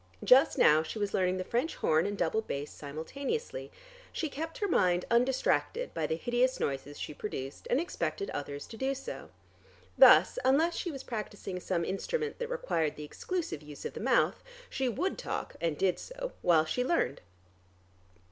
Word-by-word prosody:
Just 260 +2 +6
now 155 +1 +6
she 160 +7 -6
was 205 -1 -2
learning 185 -1 +2
the 185 - -2
French 240 - -1
horn 160 +4 +2
and 205 0 -3
double 175 +5 +1
bass 145 -8 -5
simultaneously. 275 - -5 0.4
She 320 - -2
kept 320 +4 -5
her 410 - 0
mind 180 - +2
undistracted 260 - +1
by - - -1
the 160 - 0
hideous 245 +8 +1
noises 140 +1 -3
she - - -5
produced, 140 -6 -6
and 250 - +3
expected 375 +4 -3
others 145 0 -5
to 225 - -10
do 270 +3 0
so. 370 - -7 0.7
Thus - - +8
unless 320 +6 +3
she 355 - -2
was 275 -4 -6
practising 205 -5 -5
some 175 -2 -1
instrument 450 - -2
that 480 -1 -3
required 480 - -1
the 150 - -7
exclusive 335 - -4
use 150 -1 -10
of - - -4
the - - -6
mouth, - - +2 0.3
she 265 -1 0
would 340 - -2
talk - - -4
(and 165 -3 0
did 190 -2 +1
so) - - -6
while 165 -3 +4
she 250 +10 -1
learned. 255 - 0
225 Hz, 175 wpm, -31 LUFS, -, 0.7 s, Thus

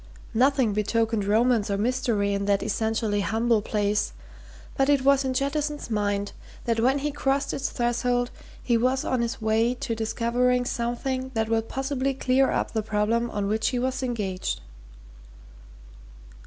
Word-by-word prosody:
Nothing 255 -2 +3
betokened 220 0 0
romance 220 +1 +2
or 200 - 0
mystery 220 -3 0
in 200 0 -1
that 200 -1 +2
essentially 220 -1 0
humble 225 +3 +1
place, 205 0 0 0.6
but 270 +1 +2
it 280 -2 +3
was 275 0 +4
in 260 -1 -2
Jettison's 290 0 -2
mind 205 -1 0 0.3
that 230 -1 +1
when 260 +4 +3
he 295 +1 -2
crossed 275 0 0
its 270 - -2
threshold 245 0 0 0.3
he 240 -2 +2
was 255 +3 +1
on 255 - 0
his 235 -1 -3
way 225 +3 +2
to 235 - -3
discovering 245 +3 +1
something 255 +2 -2
that 220 0 0
would 225 0 0
possibly 270 0 -1
clear 265 0 +2
up - - -1
the 220 - 0
problem 220 +3 0
on 205 -2 -2
which 220 +2 0
he 255 - 0
was 260 +2 -1
engaged. 210 -7 -2
235 Hz, 155 wpm, -26 LUFS, 215-260 Hz, 0.6 s, was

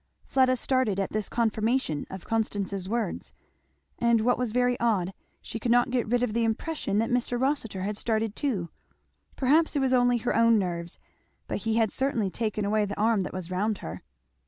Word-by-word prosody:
Fleda 260 -1 +3
started 255 -5 +1
at 195 - -1
this 215 -2 -2
confirmation 225 - 0
of 190 -1 -8
Constance's 200 -4 -2
words; 190 - -2 0.7
and 235 -1 +3
what 245 +2 +3
was 250 -3 -1
very 245 +1 +2
odd, 195 -6 +1 0.3
she 225 - -5
could 235 +1 -1
not 245 +1 +4
get 250 -3 0
rid 245 +2 +1
of 220 - 0
the 235 0 +1
impression 225 -1 -1
that 225 +2 +1
Mr. 245 0 +1
Rossitur 260 -8 -1
had 205 +2 -2
started 220 -2 -1
too. 210 - -2 0.7
Perhaps 300 +5 +3
it - - +2
was 265 -1 +1
only 245 -1 +4
her 240 +1 -1
own 230 -1 +5
nerves, 175 -3 -3 0.5
but - - -2
he 225 0 +1
had 225 -2 +2
certainly 245 -8 0
taken 215 -1 -2
away 210 +1 +2
the 200 0 -6
arm 220 -1 +3
that 180 - -4
was 185 -1 -6
round 205 +3 0
her. 80 - -6
225 Hz, 190 wpm, -27 LUFS, 200-245 Hz, 0.7 s, own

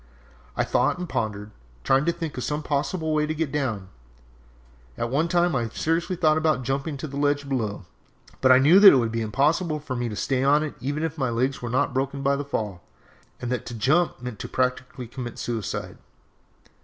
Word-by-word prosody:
I - - +2
thought - - +1
and 180 0 -5
pondered, 105 -6 -3 0.3
trying 135 +2 +3
to 170 - +3
think 165 -3 -5
of 125 - -4
some 150 +1 -2
possible 155 +3 -1
way 150 0 +1
to 155 - -2
get 155 -3 -2
down! 115 -10 -2 1.1
At 120 0 -2
one 155 +5 +1
time 175 -1 +2
I 120 -3 0
thought 110 - -14
seriously 170 +3 0
of 155 -4 +2
jumping 140 +3 -2
to 145 - -5
the 140 0 -7
ledge 145 0 +1
below, 110 -8 -2 0.6
but 130 - +5
I 130 - +8
knew 150 +8 +6
that 200 -1 +11
it - - +5
would 115 -3 +1
be 115 0 -2
impossible 150 - +1
for 140 -3 -5
me 120 -1 -2
to 105 - -5
stay 130 +4 0
on 145 +2 +4
it 155 - -4
even 145 +4 -2
if 160 -1 -3
my 130 -3 +1
legs 130 +4 -1
were 120 - -4
not 130 +3 +1
broken 135 +1 -2
by 140 0 +3
the 140 - -3
fall, 105 -10 -4 0.6
and 120 - -4
that 125 - -1
to 120 - -6
jump 155 +10 +2
meant 125 -3 -7
practically 125 0 -2
to 115 - -17
commit 120 -3 -6
suicide! 115 -4 -4
135 Hz, 210 wpm, -25 LUFS, 120-155 Hz, 1.1 s, that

